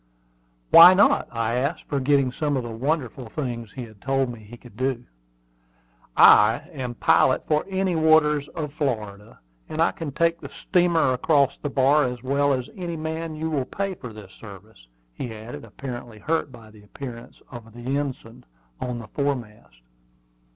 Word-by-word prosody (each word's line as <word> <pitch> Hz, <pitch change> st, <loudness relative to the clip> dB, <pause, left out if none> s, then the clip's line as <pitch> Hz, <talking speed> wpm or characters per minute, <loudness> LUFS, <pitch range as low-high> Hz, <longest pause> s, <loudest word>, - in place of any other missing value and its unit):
"Why 180 Hz, +3 st, +10 dB
not?" 200 Hz, -, +4 dB
I 115 Hz, -1 st, -1 dB
asked, 140 Hz, +6 st, -2 dB
forgetting 140 Hz, -1 st, +1 dB
some 145 Hz, +1 st, -1 dB
of 130 Hz, -, -2 dB
the 120 Hz, -, -6 dB
wonderful 130 Hz, 0 st, -3 dB
things 120 Hz, -4 st, -5 dB
he 130 Hz, -, -6 dB
had 110 Hz, -4 st, -14 dB
told 135 Hz, -2 st, 0 dB
me 120 Hz, -, -11 dB
he 110 Hz, +3 st, -13 dB
could 120 Hz, -3 st, -16 dB
do. 130 Hz, 0 st, -2 dB, 1.1 s
"I 105 Hz, +3 st, +6 dB
am 130 Hz, -6 st, -5 dB
a -, -, -23 dB
pilot -, -, +3 dB
for 150 Hz, 0 st, +1 dB
any 190 Hz, -2 st, 0 dB
waters 155 Hz, -2 st, +3 dB
of 150 Hz, -3 st, -6 dB
Florida, 110 Hz, -8 st, -4 dB, 0.3 s
and 155 Hz, -, -6 dB
I 165 Hz, -, +3 dB
can 160 Hz, -4 st, -6 dB
take 165 Hz, +3 st, 0 dB
the -, -, -8 dB
steamer 175 Hz, -7 st, +1 dB
across 140 Hz, +1 st, +2 dB
the 145 Hz, -, -4 dB
bar 140 Hz, +2 st, +3 dB
as 125 Hz, -1 st, -5 dB
well 140 Hz, +2 st, +1 dB
as 130 Hz, -1 st, -1 dB
any 175 Hz, -4 st, -5 dB
man 160 Hz, 0 st, -4 dB
you 160 Hz, +1 st, -3 dB
will 140 Hz, -4 st, -1 dB
pay 195 Hz, +7 st, -3 dB
for 125 Hz, -9 st, -9 dB
this 105 Hz, -3 st, -12 dB
service," 100 Hz, -, -14 dB, 0.3 s
he 115 Hz, -, -6 dB
added, 110 Hz, +3 st, -9 dB
apparently 120 Hz, 0 st, -8 dB
hurt 155 Hz, +5 st, -2 dB
by 115 Hz, -3 st, -14 dB
the 105 Hz, -1 st, -17 dB
appearance 115 Hz, +3 st, -10 dB
of 115 Hz, -3 st, -10 dB
the 120 Hz, +4 st, -4 dB
ensign 125 Hz, -4 st, -6 dB, 0.4 s
on 125 Hz, -1 st, -4 dB
the 115 Hz, -2 st, -9 dB
foremast. 115 Hz, -, -4 dB
130 Hz, 170 wpm, -24 LUFS, 115-150 Hz, 1.1 s, Why